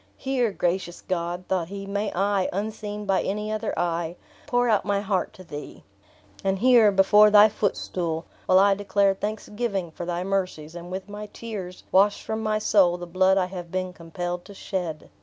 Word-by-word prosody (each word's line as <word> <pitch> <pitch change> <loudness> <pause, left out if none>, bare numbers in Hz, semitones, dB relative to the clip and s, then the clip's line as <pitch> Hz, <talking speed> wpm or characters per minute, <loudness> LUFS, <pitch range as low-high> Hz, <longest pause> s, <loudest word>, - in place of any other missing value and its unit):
Here, 255 -4 0
gracious 175 -1 -1
God," 175 0 -3
thought 180 -3 0
he, 195 +2 -7
"may 200 +1 -2
I, 195 0 +1
unseen 210 +1 -4
by 195 -1 +2
any 210 +2 -2
other 215 0 -2
eye, 170 -1 -1 0.3
pour 245 0 +2
out 215 -3 +3
my 200 -1 0
heart 195 -2 -1
to 185 - -12
thee. 150 -4 -9 0.6
And 195 0 +1
here, 235 -1 +6
before 205 +2 +6
thy 210 +1 +8
footstool, 175 -5 -2 0.2
will 185 - +5
I 200 +1 +6
declare 200 0 +2
thanksgiving 205 -2 -3
for 170 +2 -7
thy 175 0 -2
mercies; 185 -5 -2
and 175 0 -8
with 190 +1 -5
my 210 +1 -7
tears 195 -6 -7
wash 200 +2 +4
from 220 0 -3
my 215 -1 0
soul 195 -4 +3
the 175 - -7
blood 185 +2 +3
I 185 - +3
have 180 -2 -7
been 185 -1 -2
compelled 175 +1 -5
to 200 - -12
shed!" 175 -6 -4
195 Hz, 180 wpm, -25 LUFS, 180-210 Hz, 0.6 s, thy